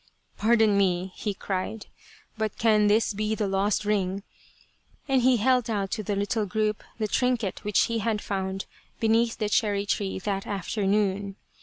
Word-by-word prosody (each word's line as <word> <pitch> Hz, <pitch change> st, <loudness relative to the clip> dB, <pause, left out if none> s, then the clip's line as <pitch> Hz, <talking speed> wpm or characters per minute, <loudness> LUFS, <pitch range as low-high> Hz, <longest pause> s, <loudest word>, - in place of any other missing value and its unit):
" -, -, -45 dB
Pardon 220 Hz, -2 st, +4 dB
me," 185 Hz, -1 st, +1 dB
he 205 Hz, -2 st, -3 dB
cried, 195 Hz, +3 st, -4 dB, 0.3 s
" 435 Hz, -1 st, -27 dB
but 220 Hz, -2 st, -2 dB
can 215 Hz, -2 st, +4 dB
this 215 Hz, +1 st, +3 dB
be 215 Hz, +1 st, -1 dB
the 215 Hz, -2 st, -1 dB
lost 195 Hz, +2 st, 0 dB
ring? 195 Hz, -2 st, 0 dB, 0.4 s
" -, -, -37 dB
and 265 Hz, -2 st, +3 dB
he 250 Hz, 0 st, +4 dB
held 250 Hz, +1 st, +2 dB
out 200 Hz, -3 st, -1 dB
to -, -, -2 dB
the 205 Hz, 0 st, -2 dB
little 205 Hz, +2 st, -1 dB
group 215 Hz, +2 st, -1 dB
the 215 Hz, -2 st, -1 dB
trinket 245 Hz, -3 st, 0 dB
which 210 Hz, -1 st, +2 dB
he 230 Hz, 0 st, 0 dB
had 215 Hz, 0 st, 0 dB
found 195 Hz, -1 st, -3 dB, 0.3 s
beneath 225 Hz, +1 st, +2 dB
the 215 Hz, -, -1 dB
cherry 205 Hz, -1 st, +1 dB
tree 200 Hz, -1 st, -1 dB
that 195 Hz, 0 st, -3 dB
afternoon. 200 Hz, 0 st, -1 dB
210 Hz, 175 wpm, -26 LUFS, 195-220 Hz, 0.4 s, Pardon